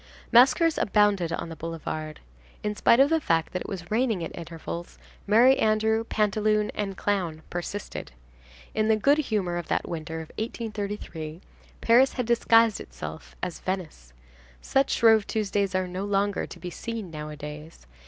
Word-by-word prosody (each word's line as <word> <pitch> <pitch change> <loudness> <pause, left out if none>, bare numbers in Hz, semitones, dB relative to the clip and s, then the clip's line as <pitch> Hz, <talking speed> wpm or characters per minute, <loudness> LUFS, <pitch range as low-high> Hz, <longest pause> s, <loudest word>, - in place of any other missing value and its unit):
Maskers 265 +7 +5
abounded 200 -4 +2
on 170 - -3
the 165 - -7
boulevard. 155 -1 -5 0.4
In 210 0 -1
spite 235 - +4
of 275 +3 +5
the 325 -1 +3
fact 165 - 0
that 180 - -2
it - - -6
was 180 -2 -7
raining 220 -5 +1
at - - -6
intervals, 170 0 -7 0.3
Merry 240 +6 +6
Andrew, 220 +1 +2
Pantaloon 215 0 +1
and 195 -2 -3
Clown 175 -6 -1
persisted. 175 - -5 0.6
In 215 0 +1
the 220 - +4
good 280 +8 +3
humor 205 -11 -1
of 175 - -5
that - - -1
winter 160 -1 -5
of 160 - -10
1833, 205 -8 -5 0.4
Paris 245 +4 +5
had 250 - -2
disguised 230 -1 +4
itself 160 - -9
as 180 -2 -3
Venice. 175 - -5 0.5
Such 270 0 +1
Shrove 220 -2 +4
Tuesdays 200 -3 -1
are 185 0 0
no 185 +2 -4
longer 200 0 0
to 175 - -11
be 175 +1 -6
seen 225 -2 -6
nowadays. 150 +1 -8
200 Hz, 155 wpm, -26 LUFS, 170-220 Hz, 0.6 s, Merry